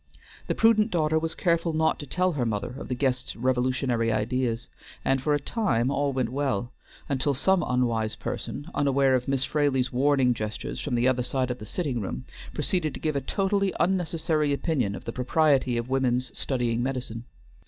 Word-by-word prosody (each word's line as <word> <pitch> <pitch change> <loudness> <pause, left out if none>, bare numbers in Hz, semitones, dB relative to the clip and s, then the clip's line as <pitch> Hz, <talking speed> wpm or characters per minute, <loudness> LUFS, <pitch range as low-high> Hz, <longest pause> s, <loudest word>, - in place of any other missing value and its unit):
The - - 0
prudent 225 -1 +4
daughter 160 -4 +2
was 160 0 -3
careful 170 -1 +1
not 160 0 +2
to 145 - -7
tell 180 +6 +1
her 145 -7 -1
mother 105 -3 -2
of 140 - -7
the 125 - -2
guest's 125 -1 -1
revolutionary 125 -1 +1
ideas, 120 +2 -1 0.4
and 135 -1 +2
for 150 +2 +2
a - - 0
time 135 - 0
all 140 0 +1
went 130 -3 -1
well, 130 -4 -1 0.4
until 140 +1 0
some 190 +7 +3
unwise 115 -3 0
person, 145 - -5
unaware 140 -1 +3
of 125 -1 +1
Miss 135 -1 +1
Fraley's 135 -4 +1
warning 135 -1 +3
gestures 110 +6 -4
from 135 -5 -2
the 120 +1 +3
other 130 -1 +2
side 130 0 -1
of 125 - -5
the 105 - -9
sitting 140 - -2
room, 105 +6 -5 0.3
proceeded 160 -1 -1
to - - -7
give 155 -2 -1
a 140 - 0
totally 195 +5 0
unnecessary 165 -4 +1
opinion 140 - 0
of - - -9
the 115 - -4
propriety 130 -1 +2
of 120 0 -2
women's 130 -1 0
studying 120 -3 0
medicine. 125 -3 -3
135 Hz, 185 wpm, -26 LUFS, 125-155 Hz, 0.4 s, prudent